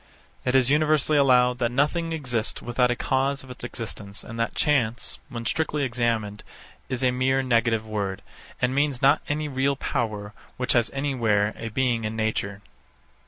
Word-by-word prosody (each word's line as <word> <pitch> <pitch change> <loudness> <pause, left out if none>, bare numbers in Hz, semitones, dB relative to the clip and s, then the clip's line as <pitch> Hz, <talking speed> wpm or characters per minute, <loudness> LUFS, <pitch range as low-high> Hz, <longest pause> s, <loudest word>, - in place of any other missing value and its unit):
It 125 0 +1
is 130 0 +4
universally 155 0 +3
allowed 125 -2 +4
that 120 -1 +1
nothing 150 +6 +1
exists 125 -8 -1
without 125 +1 +1
a 120 - +1
cause 135 +3 0
of 130 - -11
its 125 - -10
existence, 110 -4 -6
and 115 0 -8
that 115 - -1
chance, 125 -6 0
when 115 -1 -6
strictly 150 0 0
examined, 115 -5 -1 0.5
is 130 -1 -2
a 130 - +4
mere 130 +1 +1
negative 115 -3 +2
word, 100 -3 -3 0.4
and 125 0 +1
means 140 -2 0
not 140 +3 +5
any 150 +1 -1
real 140 0 +1
power 105 -5 -3 0.2
which 125 0 0
has 120 -2 +3
anywhere 115 -7 +1
a 115 - -5
being 120 0 0
in 110 +1 -3
nature. 105 -2 -2
125 Hz, 165 wpm, -25 LUFS, 115-135 Hz, 0.5 s, not